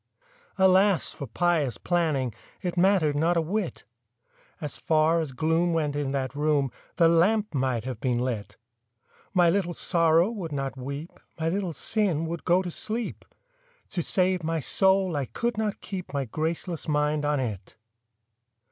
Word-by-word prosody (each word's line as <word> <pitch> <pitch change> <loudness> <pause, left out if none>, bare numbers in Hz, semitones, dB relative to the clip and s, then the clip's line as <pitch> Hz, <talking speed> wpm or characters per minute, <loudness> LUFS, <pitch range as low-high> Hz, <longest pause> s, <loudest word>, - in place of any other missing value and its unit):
Alas 190 0 +4
for 140 - -7
pious 155 -1 +1
planning— 155 - 0 0.3
It 180 -1 -2
mattered 175 -5 +3
not 165 +4 +2
a - - +3
whit! 200 +7 -3 0.7
As 150 -4 -4
far 160 +1 +2
as 155 -4 -3
gloom 160 +5 +1
went 150 -3 0
in 145 -2 -1
that 135 -1 -2
room, 145 -2 +1 0.2
The 170 - +5
lamp 200 +6 +3
might 130 -4 0
have 125 -3 -5
been 125 -1 0
lit! 120 -4 -3 0.8
My 175 -1 +5
Little 175 -3 -1
Sorrow 165 +2 +3
would 185 -8 -5
not 135 -2 -3
weep, 140 +5 -7 0.2
My 160 0 0
Little 185 0 -1
Sin 165 0 0
would 165 0 -5
go 180 +2 +3
to 180 - -4
sleep— 220 +6 -4 0.6
To 175 - -2
save 185 +1 +1
my 165 0 -1
soul 190 +3 +3
I 140 -2 -1
could 235 - -2
not 215 -1 -2
keep 185 -3 -6
My 140 -1 -1
graceless 160 +6 -3
mind 150 0 +1
on 145 -1 +1
it! 105 -7 -5
165 Hz, 155 wpm, -26 LUFS, 145-180 Hz, 0.8 s, The